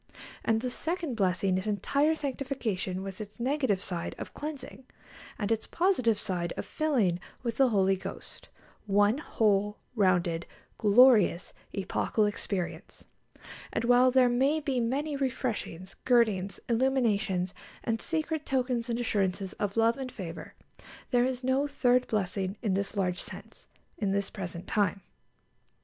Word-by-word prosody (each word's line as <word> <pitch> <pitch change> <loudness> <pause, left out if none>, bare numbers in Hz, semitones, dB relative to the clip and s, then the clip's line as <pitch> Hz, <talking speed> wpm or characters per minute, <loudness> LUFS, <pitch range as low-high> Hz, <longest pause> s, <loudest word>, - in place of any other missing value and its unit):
And 225 0 +2
the 250 0 -2
second 330 0 -2
blessing 185 -2 +1
is 190 - -6
entire 280 - +2
sanctification, 255 -10 -3
with 195 +1 -6
its 210 +1 -9
negative 255 -6 0
side 170 -2 -4
of - - -7
cleansing, 285 -3 -7 0.5
and 210 0 -2
its 225 -1 0
positive 295 - +2
side 180 -5 -3
of - - -3
filling 235 - +1 0.2
with 235 -2 -2
the 270 -2 +5
Holy 195 -3 +3
Ghost 190 - -9 0.4
one 205 +5 +3
whole, 210 -7 +1 0.2
rounded, 175 -5 +2 0.3
glorious, 215 -4 +5 0.2
epochal 200 +2 0
experience. 200 -3 -4 0.7
And - - -1
while 245 +1 +6
there 255 0 +5
may 265 +6 +2
be 275 -4 -1
many 280 +6 -1
refreshings, 240 -9 -3
girdings, 215 -6 +2
illuminations, 225 -7 +1 0.3
and 225 -1 -1
secret 315 -1 -1
tokens 250 -3 -1
and 235 0 -1
assurances 195 -4 -1
of 205 +1 -2
love 230 +3 +3
and 260 -1 -5
favour, 175 -7 -8 0.6
there 245 -1 +4
is 255 0 -2
no 265 +3 +2
third 250 -3 +2
blessing 195 -1 -1
in 205 -4 +1
this 200 +2 -2
large 180 -1 0
sense, - - -8 0.3
in 195 -2 0
this 200 0 -1
present 175 -1 -6
time. 200 -2 0
225 Hz, 140 wpm, -29 LUFS, 195-260 Hz, 0.7 s, while